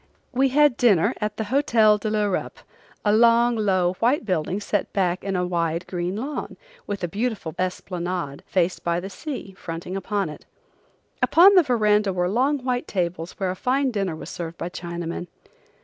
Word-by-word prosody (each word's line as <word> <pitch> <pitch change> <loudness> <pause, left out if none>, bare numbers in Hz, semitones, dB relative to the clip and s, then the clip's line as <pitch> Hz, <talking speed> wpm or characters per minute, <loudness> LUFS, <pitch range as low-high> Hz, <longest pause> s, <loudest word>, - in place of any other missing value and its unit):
We 265 +2 +2
had 295 -1 +4
dinner 205 -2 +4
at 210 0 -2
the 220 - -1
Hotel 220 -3 +3
de 215 - -2
l'Europe, 210 -3 -1 0.5
a 205 - +4
long, 235 +1 +5
low, 185 -5 +1
white 240 +2 +2
building 185 0 -1
set 205 0 -2
back 185 -2 0
in 195 0 -2
a 180 0 0
wide, 170 -1 -1
green 180 +1 -3
lawn, 270 +8 -5 0.3
with 200 -2 -4
a - - +1
beautiful 210 -4 -3
esplanade, 180 -4 -3
faced 180 -1 0
by 170 0 0
the 195 +2 -7
sea, 260 -7 -6
fronting 170 0 -6
it. 195 -5 -3 0.8
Upon 375 +4 +7
the 370 - +7
verandah 210 - +2
were 180 0 0
long 260 +6 +1
white 250 -1 -1
tables 175 -2 -2
where 190 -2 -2
a - - -4
fine 265 +6 +1
dinner 195 -7 -2
was 155 0 -8
served 170 -1 -6
by 170 - -4
Chinamen. 170 0 -5
195 Hz, 170 wpm, -24 LUFS, 175-235 Hz, 0.8 s, Upon